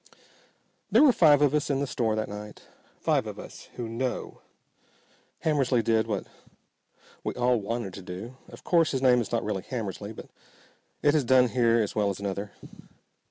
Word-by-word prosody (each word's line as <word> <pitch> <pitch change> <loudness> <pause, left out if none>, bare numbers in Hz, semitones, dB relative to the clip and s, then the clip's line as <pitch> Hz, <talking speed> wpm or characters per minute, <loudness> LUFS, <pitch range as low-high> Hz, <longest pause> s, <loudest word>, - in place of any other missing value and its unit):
There - - +6
were 290 - +7
five 150 - +5
of 145 -1 +3
us 150 -1 0
in 140 -1 +1
the 140 - 0
store 115 -4 -1
that 110 0 -2
night. 105 +1 -9 0.4
Five - - +1
of - - -7
us - - -11
who 120 -2 -4
know. 120 +2 -4 1.0
Hammersly 135 -6 +2
did 110 0 +2
what 105 -3 -2 1.0
we - - -3
all 125 -2 +2
wanted 110 -2 -4
to 100 - -8
do. 95 +7 -8
Of - - -13
course 165 -3 +3
his 130 - -2
name 125 -2 +5
is 115 - -6
not 115 -1 0
really 105 -3 -2
Hammersly, 105 -2 -5
but - - -10 0.7
it 145 - +4
has 155 -3 +2
done 125 0 +4
here 115 -2 +3
as 105 -3 -1
well 105 -2 +1
as 100 - -4
another. 100 0 -4
115 Hz, 180 wpm, -27 LUFS, 105-130 Hz, 1.0 s, were